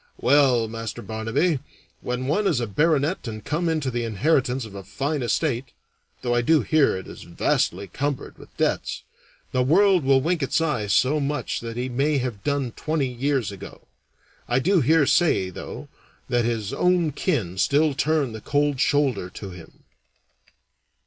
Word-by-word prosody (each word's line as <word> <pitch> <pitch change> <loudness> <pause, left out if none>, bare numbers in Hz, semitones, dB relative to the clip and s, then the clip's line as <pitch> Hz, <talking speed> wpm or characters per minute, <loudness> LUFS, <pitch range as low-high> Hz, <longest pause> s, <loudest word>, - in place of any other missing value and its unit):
Well, 130 -4 +3
Master 115 0 -6
Barnaby, 115 - 0 0.4
when 125 +1 -3
one 195 +9 +1
is 150 -9 +2
a 120 - -1
baronet 150 - +1
and 110 -1 -7
come 165 +3 -1
into 155 -5 -1
the 120 0 -2
inheritance 125 +3 +1
of 110 - -11
a 100 -1 -8
fine 140 - -2
estate 125 +1 -1 0.5
(though 120 - 0
I 120 - +3
do 155 +5 +3
hear 155 -10 +3
it 95 - -8
is - - -10
vastly - - 0
cumbered 145 -1 -4
with - - -16
debts), - - -1 0.5
the 130 - +1
world 180 +6 +4
will 135 0 +4
wink 165 +4 0
its 135 - +1
eye 150 -10 -1
to 130 +9 +3
much 145 +1 -2
that 115 0 -7
he 125 +1 -2
may 140 +4 +1
have 125 -6 -3
done 140 -4 -1
twenty 150 0 -2
years 125 -3 -1
ago. 100 0 -11 0.6
I 120 - +1
do 175 +6 +3
hear 150 +3 +4
say, 115 - +2
though, - - -8 0.4
that 120 -2 +1
his 115 -4 -2
own 180 -3 +2
kin 115 - -2
still 145 +5 +3
turn 150 -2 +1
the 110 -1 -8
cold 145 +2 0
shoulder 135 -11 +1
to 95 +1 -8
him." 85 -3 -14
135 Hz, 170 wpm, -24 LUFS, 115-150 Hz, 0.6 s, world